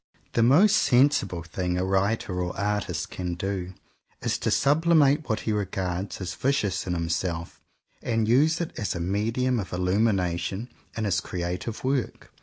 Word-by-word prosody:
The 115 - +2
most 175 - +6
sensible 125 - +3
thing 90 +2 -2
a 90 - 0
writer 95 -1 0
or 90 0 -3
artist 105 0 -2
can 90 -1 -3
do, 95 0 -4 0.5
is - - 0
to - - 0
"sublimate" 150 -1 +3
what 110 - 0
he 110 - -2
regards 95 -2 -2
as 90 -2 -4
vicious 110 -7 0
in 90 - -1
himself, 85 0 -3 0.4
and 115 -2 0
use 150 +8 +4
it 170 - -3
as 105 -6 -2
a - - -3
medium 115 +8 0
of 95 - -5
illumination 95 +2 0 0.3
in 110 - -1
his 95 -4 +1
creative 90 +5 -4
work. 130 -2 -2
100 Hz, 155 wpm, -26 LUFS, 90-125 Hz, 0.5 s, most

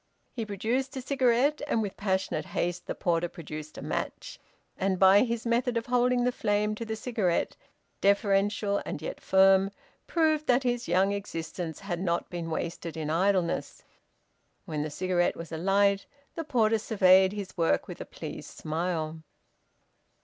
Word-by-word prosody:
He 225 -3 -4
produced 245 +7 -2
a - - -3
cigarette, 265 +2 +2
and 230 - +1
with 200 - -5
passionate 190 -2 -1
haste 175 +1 -1
the - - -3
porter 170 -1 0
produced 155 -2 -8
a - - -7
match, - - -4 0.4
and 190 -1 0
by 190 +2 +7
his 235 -2 -1
method 235 +1 +1
of 230 - -2
holding 245 0 +2
the 250 - +2
flame 210 -2 0
to 215 - -5
the 220 0 -3
cigarette, 220 -6 -1 0.5
deferential 200 +1 +2
and - - -5
yet 155 - -6
firm, 190 0 +5 0.4
proved 310 -2 +1
that 250 +2 +3
his 245 -1 -1
young 185 +3 +3
existence 165 -4 -5
had 180 -4 -3
not 170 -2 -1
been 170 -2 -4
wasted 165 0 -4
in 155 -1 -2
idleness. 185 0 0 0.8
When 155 -5 -3
the 155 - -2
cigarette 180 +3 0
was 165 0 -8
alight, 195 +4 +2 0.3
the 330 - -4
porter 225 -6 +2
surveyed 190 -3 +5
his 200 -2 -6
work 165 - +1
with - - -8
a - - -5
pleased - - -8
smile. 160 0 -2
195 Hz, 155 wpm, -28 LUFS, 175-230 Hz, 0.8 s, by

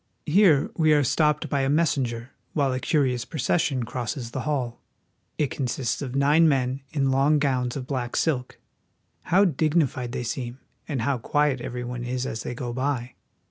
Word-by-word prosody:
Here 165 -3 +4
we 155 -2 +4
are 145 -1 +4
stopped 150 +3 +2
by 140 -2 0
a 135 - +1
messenger 130 -6 0 0.2
while 140 -3 +1
a 130 - -1
curious 130 -5 +1
procession 140 -3 0
crosses 120 0 -4
the 130 - -3
hall. 125 -5 -2 0.6
It 150 -3 0
consists 130 -2 -2
of 130 -2 -5
nine 150 +4 +5
men 130 -1 0
in 135 -3 +1
long 140 +3 +3
gowns 130 -4 0
of 135 -3 -4
black 125 -3 -3
silk. 130 -6 -1 0.7
How 195 +4 +4
dignified 150 -6 +1
they 125 - -3
seem, 120 +1 -4 0.3
and 135 -7 -2
how 135 0 0
qfiiet 145 +1 +1
every 125 0 -4
one 120 0 -5
is 125 +1 -2
as 110 - -4
they 120 - -5
go 120 -1 -4
by! 130 -1 -2
135 Hz, 175 wpm, -25 LUFS, 125-150 Hz, 0.7 s, nine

